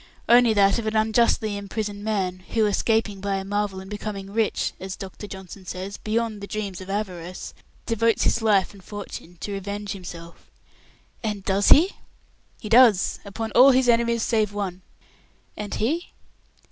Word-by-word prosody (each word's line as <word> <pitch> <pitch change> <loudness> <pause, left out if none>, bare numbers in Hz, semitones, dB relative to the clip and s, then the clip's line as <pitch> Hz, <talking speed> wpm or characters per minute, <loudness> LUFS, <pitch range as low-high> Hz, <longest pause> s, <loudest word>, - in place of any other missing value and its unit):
"Only 240 -1 +6
that 200 +2 +4
of 220 - -4
an 215 - -1
unjustly 220 -1 +2
imprisoned 205 0 -4
man, 190 -4 -1 0.2
who, 220 -1 +4
escaping 210 -1 +1
by 200 0 -1
a 195 0 -3
marvel, 205 -1 -2
and 190 - -10
becoming 205 -1 -6
rich 220 -1 0
as 190 0 -5
Dr. 195 +2 -8
Johnson 190 0 -10
says, 190 +3 -5
'beyond 220 -1 -2
the 200 - -6
dreams 200 -4 -4
of 185 - -10
avarice' 185 -3 -4 0.3
devotes 230 0 +2
his - - +2
life 210 -4 +3
and 195 -2 -15
fortune 190 -4 -8
to 205 - -4
revenge 200 +1 -4
himself." 170 -3 -9 0.7
"And 210 -3 -3
does 195 +1 +2
he?" 350 +7 +6 0.6
"He 215 - -7
does, 225 -4 +5
upon 220 +3 -5
all 260 +3 +8
his 260 -1 +4
enemies 235 -1 +3
save 215 -3 +1
one." 190 -3 -4 0.7
"And 210 -1 -5
he 310 +11 -1
205 Hz, 160 wpm, -24 LUFS, 195-225 Hz, 0.7 s, all